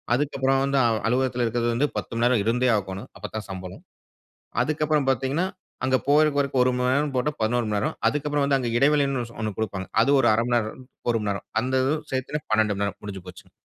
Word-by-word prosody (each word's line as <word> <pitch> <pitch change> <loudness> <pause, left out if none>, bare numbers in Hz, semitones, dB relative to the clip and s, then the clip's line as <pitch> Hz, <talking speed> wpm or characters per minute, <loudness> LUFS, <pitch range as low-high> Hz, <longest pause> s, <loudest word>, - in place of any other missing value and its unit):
அதுக்கப்புறம் 135 -1 +1
வந்து 140 0 +1 0.3
அலுவலகத்தில 125 0 +1
இருக்கிறது 120 +1 0
வந்து 145 +5 +2
10 - - -4
மணி 115 - 0
நேரம் 125 -3 +3
இருந்தே 125 +2 +2
ஆகணும். 95 0 -6
அப்ப - - -7
தான் 110 -3 -4
சம்பளம், 95 -1 -8 0.8
அதுக்கு 155 0 -1
அப்புறம் 150 -3 +1
பார்த்தீங்கன்னா, 135 +7 0 0.4
அங்கு 130 0 +3
போற 155 +1 +6
வரைக்கும் 135 -2 +2
1 125 - +2
மணி 125 0 +1
நேரம் 145 0 0
போட்டா 150 +4 0
11 115 +1 +1
மணி 105 - +1
நேரம், 155 +8 -2
அதற்கு 150 0 -3
அப்புறம் 145 -1 +1
வந்து 140 -1 +3
அங்க 120 -2 -2
இடைவெளினு 140 -3 +2 0.2
ஒன்னு 110 -3 -3
கொடுப்பாங்க, 95 -3 -3
அது 140 - +2
ஒரு 120 - +4
1/2 115 +2 +1
மணி 120 - +4
நேரம், 115 +3 -4 0.3
1 115 - +1
மணி 105 - -1
நேரம். 100 - -6
அந்த 130 +2 0 0.4
சேர்த்து 140 +3 -3
12 110 -1 +2
மணி 100 +1 -1
நேரம். 100 - -5
முடிஞ்சு 95 -3 -7
போச்சுங். 90 - -12
125 Hz, 210 wpm, -25 LUFS, 110-140 Hz, 0.8 s, போற